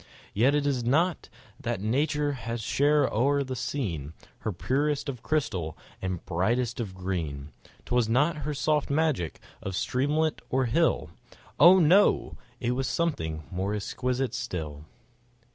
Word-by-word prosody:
Yet 125 +7 +3
it 145 -1 +1
was 135 -4 0
not 160 +8 +1 0.3
that 120 -7 -2
nature 145 +7 +1
had 120 -3 -4
shed 145 +6 +3
o'er 140 +5 +2
the 130 -1 -5
scene 85 - -3 0.3
Her 110 - -2
purest 140 - 0
of 125 -4 -5
crystal 95 - -1 0.2
and 95 -2 -3
brightest 115 +8 0
of 100 -5 -4
green; 80 -7 -4 0.3
'Twas 120 -2 +1
not 145 +7 +2
her 150 0 -3
soft 150 +1 +1
magic 140 - 0 0.2
of 95 -1 -4
streamlet 150 +8 0
or 130 +1 +1
hill, 160 +8 +1 0.5
Oh! 175 +4 +9
no—it 150 -8 +2
was 130 +1 -1
something 80 - -1
more 95 +3 -1
exquisite 125 +4 -2
still. 80 - -5
125 Hz, 135 wpm, -28 LUFS, 95-145 Hz, 0.5 s, Oh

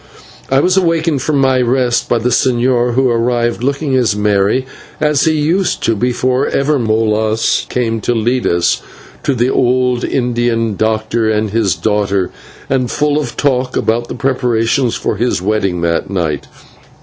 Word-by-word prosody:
I 135 +1 +3
was 185 +3 +2
awakened 165 -5 +1
from 150 +2 0
my 130 -1 +2
rest 125 0 0
by 120 - +2
the 115 +2 0
señor, 120 0 +1
who 130 0 +3
arrived, 120 0 0
looking 140 +2 -1 0.2
merry 105 +4 +1 0.3
as 150 -3 +2
he 160 - +3
used 160 +5 0
to 115 - +1
be 120 +4 0
before 125 +2 0
ever 140 +1 +1
Molas 110 -1 0
came 115 -3 -1
to 120 - 0
lead 120 +3 0
us 85 0 +1 0.4
to 140 - 0
the 125 +2 +1
old 125 -1 +1
Indian 120 -3 0
doctor 110 +1 0
and 105 -1 0
his 105 -6 +1
daughter, 100 +1 0 0.4
and 130 -2 0
full 150 +2 0
of 125 -6 -5
talk 130 -3 0
about 120 +2 0
the - - -6
preparations 125 -2 0
for 105 - -2
his 120 -1 0
wedding 95 -2 -1
that 85 +1 -1
night. 85 -7 -2
120 Hz, 160 wpm, -15 LUFS, 110-130 Hz, 0.4 s, I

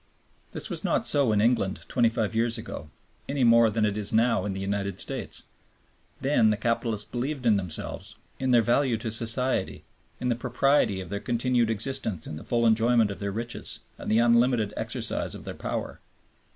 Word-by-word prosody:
This - - -4
was - - -5
not - - 0
so 140 -5 +2
in 105 -1 +2
England 110 -4 +1
twenty 120 -2 +2
five 110 -1 -2
years 115 +1 +1
ago, 110 -9 -8 0.4
any 140 -2 0
more 115 -1 +6
than 110 0 +1
it 105 -1 0
is 105 -2 -3
now 115 -3 +2
in 100 - -2
the 95 - -5
United 100 0 -2
States. - - -3 0.8
Then 130 -5 +3
the 105 - +1
capitalists 115 -1 -1
believed 130 +2 -4
in 110 -3 +5
themselves, 90 -5 -4 0.2
in 130 - -1
their 120 -2 +5
value 120 +1 +2
to 115 0 -4
society, 115 -1 0 0.4
in 125 - -1
the 120 - +2
propriety 125 -4 +1
of 90 - -9
their 100 - -2
continued 120 0 0
existence 110 - 0
in - - -6
the 75 - -8
full 120 -1 0
enjoyment 115 -1 +3
of 100 - -7
their 100 0 -3
riches 115 +4 -4 0.2
and - - -6
the 110 - +4
unlimited 120 -2 +3
exercise - - -1
of - - -9
their - - -6
power. - - -5
115 Hz, 190 wpm, -26 LUFS, 105-120 Hz, 0.8 s, more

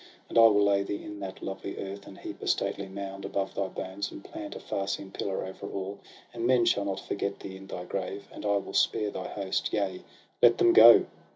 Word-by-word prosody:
And - - -2
I 115 - +10
will 105 -2 +4
lay 100 -1 +3
thee 100 +1 -4
in 105 -1 -8
that 95 -1 -7
lovely 95 0 -5
earth, 100 +1 -6
And 95 - -11
heap - - -8
a - - -5
stately 100 - 0
mound 95 0 -6
above 95 -1 -2
thy 100 - -1
bones. 95 +1 -5
And - - -10
plant - - -7
a - - -6
far 100 0 -3
seen 100 0 -3
pillar 95 -1 -3
over 95 - -7
all. 100 +1 -5 0.3
And 115 0 -1
men 125 -2 +4
shall 100 -3 +2
not 95 -1 -2
forget 100 0 -2
thee 95 - -8
in 95 0 -11
thy 90 -2 -6
grave. 100 +1 -4
And - - -9
I 100 -1 +2
will 100 - -5
spare 105 -2 +2
thy - - -5
host; 100 -2 -2
yea, 95 -3 -1 0.4
let - - +7
them 355 -1 +5
go 405 - +9
100 Hz, 235 wpm, -29 LUFS, 95-100 Hz, 0.4 s, I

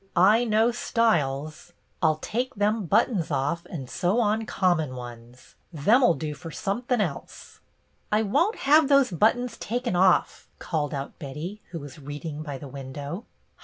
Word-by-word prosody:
I 215 +7 +5
know 220 +1 +3
styles. 155 - 0 0.3
I 165 - +4
'll 155 - +3
take 250 +4 -2
them 210 -1 0
buttons 190 -2 +2
off 145 +4 -1
and 135 -7 -6
sew 180 - 0
on 220 0 +1
common 160 -8 +1
ones. 120 0 -11 0.2
Them 205 - +3
'll 175 - +5
do 155 -2 -4
fer 165 +3 -9
somethin' 240 +8 -2
else." 165 -10 -5 0.3
" 65 +2 -42
I 215 +1 +3
won't 340 - +1
have 300 +2 +6
tho^e 270 - +3
buttons 245 +3 +2
taken 240 -2 -2
off," 185 0 +2
called 150 -3 -2
out 140 0 -6
Betty, 155 +9 -6
who 170 - -6
was 145 -1 -10
reading 145 +2 -6
by 145 -3 -5
the 140 - -9
window. 140 - -7
175 Hz, 165 wpm, -26 LUFS, 145-225 Hz, 0.3 s, have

